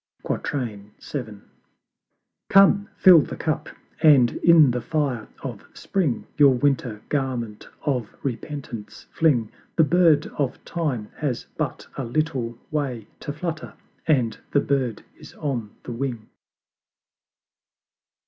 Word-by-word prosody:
VII. 110 Hz, -1 st, -4 dB, 1.1 s
Come, 195 Hz, +1 st, +5 dB
fill 185 Hz, -4 st, +8 dB
the -, -, -3 dB
Cup, 155 Hz, -1 st, -2 dB, 0.3 s
and 140 Hz, -7 st, +6 dB
in 160 Hz, -6 st, +6 dB
the 120 Hz, 0 st, -2 dB
fire 140 Hz, -7 st, -1 dB, 0.2 s
of -, -, -6 dB
Spring 165 Hz, -11 st, -1 dB
Your 140 Hz, -3 st, +7 dB
Winter 125 Hz, -5 st, 0 dB
garment 125 Hz, -7 st, -2 dB, 0.2 s
of 125 Hz, -7 st, -1 dB
Repentance 130 Hz, -3 st, -6 dB
fling: 125 Hz, -9 st, +2 dB, 0.2 s
The 160 Hz, -, +5 dB
Bird 155 Hz, -1 st, +4 dB
of 135 Hz, -3 st, -2 dB
Time 140 Hz, -11 st, -2 dB
has 140 Hz, -6 st, -2 dB
but -, -, -3 dB
a 135 Hz, -, -2 dB
little 125 Hz, -3 st, -1 dB
way 135 Hz, -8 st, -2 dB
To -, -, -5 dB
flutter 160 Hz, +2 st, -5 dB, 0.3 s
and 125 Hz, -8 st, +2 dB
the 145 Hz, -, +3 dB
Bird 135 Hz, -6 st, -1 dB, 0.2 s
is -, -, -13 dB
on 125 Hz, -8 st, -3 dB
the -, -, -7 dB
Wing. 120 Hz, -3 st, -4 dB
135 Hz, 115 wpm, -24 LUFS, 120-155 Hz, 1.1 s, fill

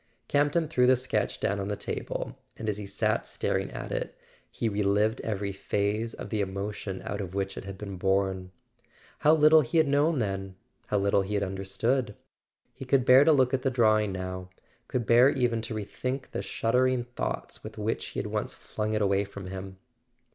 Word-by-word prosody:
Camp 145 Hz, 0 st, +2 dB
ton 170 Hz, -2 st, +1 dB
threw 125 Hz, -5 st, +3 dB
the 130 Hz, -, +7 dB
sketch 130 Hz, +1 st, -1 dB
down 100 Hz, +1 st, 0 dB
on 100 Hz, -, -3 dB
the 105 Hz, -, -1 dB
table; -, -, -4 dB, 0.2 s
and 110 Hz, -, -5 dB
as 105 Hz, -1 st, 0 dB
he 105 Hz, -1 st, -6 dB
sat 100 Hz, -, 0 dB
staring -, -, -1 dB
at -, -, -7 dB
it -, -, -3 dB, 0.3 s
he 115 Hz, -, -2 dB
relived 105 Hz, +1 st, +1 dB
every 100 Hz, -2 st, -2 dB
phase 105 Hz, +3 st, -1 dB
of -, -, -8 dB
the 110 Hz, -2 st, 0 dB
emotion 100 Hz, 0 st, -4 dB
out 105 Hz, -, -3 dB
of 95 Hz, -1 st, -6 dB
which 95 Hz, -1 st, -2 dB
it -, -, -7 dB
had 100 Hz, -1 st, -7 dB
been 100 Hz, -1 st, -6 dB
born. 95 Hz, 0 st, 0 dB, 0.7 s
How 155 Hz, +2 st, +5 dB
little 155 Hz, 0 st, +7 dB
he 145 Hz, +4 st, -1 dB
had 160 Hz, -2 st, +5 dB
known 145 Hz, +3 st, +3 dB
then—how 95 Hz, -1 st, -4 dB
little 100 Hz, 0 st, +3 dB
he 100 Hz, +2 st, -3 dB
had 100 Hz, -, +1 dB
understood! 100 Hz, +5 st, -1 dB, 0.6 s
He 135 Hz, -, -9 dB
could 130 Hz, -1 st, +2 dB
bear 130 Hz, +2 st, +8 dB
to 160 Hz, -, +5 dB
look 130 Hz, -3 st, +3 dB
at 130 Hz, -, +1 dB
the 135 Hz, -, +1 dB
drawing 110 Hz, -4 st, +3 dB
now; 95 Hz, 0 st, -5 dB, 0.4 s
could 125 Hz, -2 st, -1 dB
bear 120 Hz, +4 st, +6 dB
even 125 Hz, -5 st, +1 dB
to 115 Hz, 0 st, -5 dB
rethink 125 Hz, +5 st, -4 dB
the -, -, -3 dB
shuddering 125 Hz, +2 st, +1 dB
thoughts 120 Hz, +1 st, -5 dB
with 110 Hz, +1 st, -9 dB
which 110 Hz, +2 st, -2 dB
he -, -, -5 dB
had -, -, -2 dB
once -, -, -3 dB
flung 110 Hz, 0 st, -4 dB
it 105 Hz, -1 st, +1 dB
away 100 Hz, 0 st, +2 dB
from 100 Hz, -2 st, -8 dB
him. 95 Hz, 0 st, -7 dB
105 Hz, 200 wpm, -28 LUFS, 100-125 Hz, 0.7 s, bear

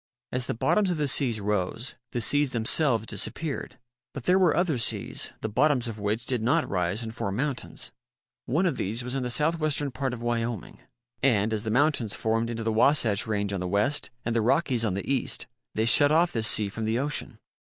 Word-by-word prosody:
As 125 Hz, 0 st, -2 dB
the -, -, -2 dB
bottoms 200 Hz, -, +2 dB
of 175 Hz, -, -1 dB
the 150 Hz, -1 st, 0 dB
seas 130 Hz, -5 st, +2 dB
rose, 105 Hz, +4 st, -1 dB, 0.2 s
the 120 Hz, -, -2 dB
seas 145 Hz, +5 st, +2 dB
themselves 115 Hz, 0 st, +1 dB
disappeared. 140 Hz, -, -2 dB, 0.4 s
But 140 Hz, -, -6 dB
there 180 Hz, +8 st, +3 dB
were 180 Hz, -4 st, +3 dB
other 170 Hz, -7 st, +1 dB
seas, 115 Hz, -, 0 dB
the -, -, -2 dB
bottoms 125 Hz, +3 st, +2 dB
of 110 Hz, -2 st, -6 dB
which 105 Hz, +4 st, -2 dB
did 125 Hz, -4 st, 0 dB
not 145 Hz, +8 st, +1 dB
rise 90 Hz, +4 st, -1 dB
and 110 Hz, -1 st, -6 dB
form 100 Hz, -3 st, -3 dB
mountains. 135 Hz, +2 st, -3 dB, 0.6 s
One 160 Hz, +9 st, +1 dB
of 170 Hz, -7 st, 0 dB
these 110 Hz, +5 st, -2 dB
was 125 Hz, +1 st, -5 dB
in 135 Hz, -, -1 dB
the 125 Hz, -, -3 dB
southwestern 150 Hz, +1 st, +1 dB
part 130 Hz, -1 st, -3 dB
of 120 Hz, -, -9 dB
Wyoming 115 Hz, -, -3 dB, 0.4 s
and, 110 Hz, -5 st, +2 dB
as 110 Hz, 0 st, -2 dB
the -, -, -1 dB
mountains 130 Hz, -3 st, +1 dB
formed 115 Hz, +1 st, 0 dB
into 115 Hz, -1 st, -4 dB
the 110 Hz, 0 st, 0 dB
Wasatch 115 Hz, -3 st, +2 dB
range 100 Hz, -2 st, -1 dB
on 95 Hz, -, -2 dB
the 90 Hz, -, -3 dB
west 105 Hz, +10 st, 0 dB, 0.2 s
and 120 Hz, 0 st, -1 dB
the 115 Hz, -, +2 dB
Rockies 130 Hz, 0 st, +1 dB
on 100 Hz, -5 st, 0 dB
the 100 Hz, -, -5 dB
east, 135 Hz, -2 st, -1 dB, 0.3 s
they 110 Hz, -, +1 dB
shut 145 Hz, +5 st, +6 dB
off 170 Hz, +3 st, +3 dB
this 110 Hz, -1 st, 0 dB
sea 110 Hz, -3 st, +4 dB
from 110 Hz, +3 st, -5 dB
the 110 Hz, +1 st, 0 dB
ocean. 135 Hz, -3 st, -2 dB
120 Hz, 210 wpm, -26 LUFS, 110-145 Hz, 0.6 s, shut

